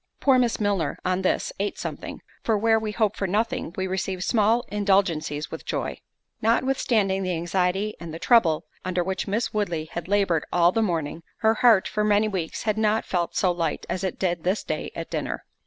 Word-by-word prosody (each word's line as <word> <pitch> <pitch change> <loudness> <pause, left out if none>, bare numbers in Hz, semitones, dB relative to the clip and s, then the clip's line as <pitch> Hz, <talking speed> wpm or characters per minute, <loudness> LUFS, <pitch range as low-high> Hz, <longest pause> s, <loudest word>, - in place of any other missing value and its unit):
Poor 265 -2 +4
Miss 240 -2 +1
Milner, 205 -5 0
on 185 +1 +1
this, 185 - 0
ate 205 +1 -2
something; - - -6 0.2
for 220 -2 +2
where 225 +1 +3
we 215 -1 -3
hope 215 -1 +1
for 195 - -2
nothing, 225 +1 -1
we 190 - 0
receive 190 0 -2
small 225 +3 +2
indulgencies 185 -7 +1
with - - -6
joy. - - -3 0.4
Notwithstanding 225 -4 +2
the 185 -2 -1
anxiety 180 +4 0
and 165 -1 -7
trouble 175 -11 +4 0.2
under 180 -1 0
which 190 +1 -3
Miss 215 +4 -1
Woodley 175 -7 -1
had 170 0 -5
laboured 195 -5 +2
all 175 0 +4
the 225 - +1
morning, 165 -5 -1 0.2
her 220 0 +4
heart 225 -3 +5
for 210 - -1
many 210 0 +3
weeks 185 -6 -3
had 215 -1 0
not 220 0 +2
felt 175 -2 -1
so 185 - +3
light 170 -1 -2
as 185 - -2
it 190 - -2
did 175 -2 -1
this 185 +4 0
day - - -3
at - - -6
dinner. - - -3
195 Hz, 190 wpm, -25 LUFS, 175-215 Hz, 0.4 s, heart